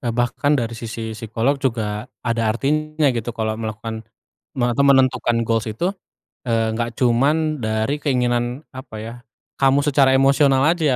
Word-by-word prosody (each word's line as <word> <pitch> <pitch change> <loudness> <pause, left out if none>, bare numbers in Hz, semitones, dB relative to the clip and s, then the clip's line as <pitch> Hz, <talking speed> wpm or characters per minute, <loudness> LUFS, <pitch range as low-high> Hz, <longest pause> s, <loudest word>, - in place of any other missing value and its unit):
eee, 120 - 0
bahkan 120 +4 +1
dari 115 -1 -2
sisi 115 -1 -6
psikolog 115 +5 -1
juga 110 -2 -2 0.2
ada 115 -1 0
artinya 155 +5 0
gitu 115 0 -3
kalau 110 -1 -1
melakukan 110 0 -5 0.6
me 120 - +2
atau 130 +4 +1
menentukan 130 -3 +3
goals 115 0 0
itu, 170 - -1 0.6
eee, 115 -1 0
nggak 115 0 -3
cuman 145 +5 +2
dari 110 +5 0
keinginan 125 0 0
apa 130 -3 -9
ya, 115 +2 -7 0.5
kamu 135 0 +4
secara 135 -2 +4
emosional 135 0 +4
aja 170 0 +1
120 Hz, 150 wpm, -21 LUFS, 115-140 Hz, 0.6 s, kamu